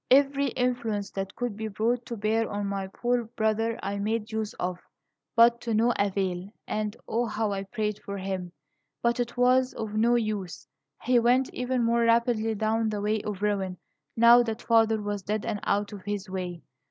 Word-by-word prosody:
"Every 275 +1 +4
influence 235 -5 -1
that 195 0 -5
could 245 -4 -3
be 220 +1 -4
brought 230 +4 -1
to 235 - -5
bear 220 +2 +1
on 205 0 -3
my 195 -1 -2
poor 240 +4 -1
brother 225 0 0
I 200 +1 -2
made 220 +2 -2
use 220 -1 -2
of, 180 0 -3 0.6
but 235 +1 +6
to 230 -2 -1
no 235 +3 +3
avail; 190 -2 -1 0.2
and, 215 +1 -2
O, 235 +2 0
how 215 -1 -1
I 195 0 -3
prayed 210 0 -2
for 200 0 -5
him! 190 -2 -4 0.5
But 235 +1 +2
it 240 0 -2
was 255 +1 +3
of 220 -2 -4
no 230 +3 +3
use! 215 -6 -2 0.4
He 245 0 +4
went 250 +3 +2
even 250 0 -1
more 235 +1 +2
rapidly 230 -1 +2
down 220 +1 +1
the 210 -1 -2
way 210 +1 0
of 205 -1 -5
ruin, 195 -3 0 0.4
now 235 +1 +8
that 230 0 -3
father 225 -1 +4
was 205 -1 -3
dead 210 +2 -2
and 220 -3 -2
out 205 +1 0
of 200 - -8
his 205 0 -4
way. 180 -2 -5
220 Hz, 190 wpm, -27 LUFS, 205-235 Hz, 0.6 s, now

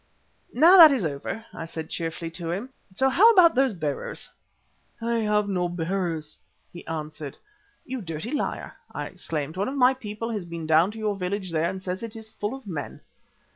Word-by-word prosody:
"Now 335 +9 +7
that 325 -4 +11
is 250 -10 +1
over," 155 +9 -4
I 165 - -6
said 160 -1 -7
cheerfully 165 0 -4
to 165 0 -5
him, 200 +9 -3 0.3
"so 265 - +3
how 405 - +7
about 350 -5 +7
those 260 -4 +2
bearers?" 150 -5 -4 0.7
"I 235 0 0
have 210 -2 +1
no 180 -3 0
bearers," 170 -3 -3 0.3
he 175 - -9
answered. 155 -2 -5 0.5
"You 255 -1 -4
dirty 165 +5 -5
liar," 295 - -3 0.2
I - - -4
exclaimed; 155 +1 -4
"one 195 - 0
of 265 - -3
my 255 0 +5
people 230 -2 -5
has 210 -5 -3
been 170 -1 -6
down 160 +4 +4
to - - -10
your 215 -2 -1
village 190 0 -3
there 165 +1 +1
and 190 0 -6
says 185 +1 -3
it 230 -1 -6
is 220 -1 -8
full 210 +3 -4
of 270 -3 -12
men." 165 -7 -6
190 Hz, 190 wpm, -25 LUFS, 165-230 Hz, 0.7 s, that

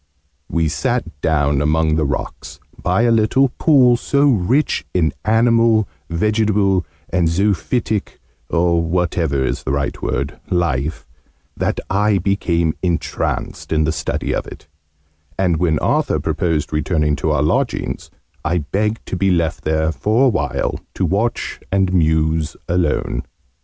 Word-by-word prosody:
We 80 -1 +1
sat 85 - -2
down 75 -3 +1
among 80 +1 +2
the 80 -1 +1
rocks, 70 - -5 0.2
by 95 +6 +1
a 120 - +3
little 115 +4 +3
pool, 130 -6 +5
so 140 +4 +1
rich 120 +8 +1
in 80 -5 +2
animal, 115 -1 +3 0.2
vegetable, 100 0 +1 0.2
and 90 -2 +1
zoophytic 105 +4 -1 0.3
or 85 0 +2
whatever 85 -5 0
is - - -2
the - - -5
right 70 0 -2
word 70 +2 -2
life, 80 -4 -1 0.5
that - - -1
I 105 +1 +2
became 85 -4 0
entranced 85 -3 -2
in 80 -1 +2
the 80 - +1
study 80 0 -2
of - - -2
it, - - -11 0.7
and, 90 -4 +2
when 80 -2 +1
Arthur - - +1
proposed 80 -4 -1
returning 75 -1 +1
to 65 - -1
our - - +2
lodgings, - - -1 0.3
I 85 +3 0
begged 105 +3 -1
to - - -4
be 95 +2 +1
left 85 -3 0
there 80 0 +1
for 110 - +2
a - - +5
while, 100 -6 -1 0.2
to - - 0
watch 110 +5 -1
and 95 -1 +1
muse 80 -2 +1
alone. 85 -3 0
90 Hz, 140 wpm, -19 LUFS, 80-105 Hz, 0.7 s, pool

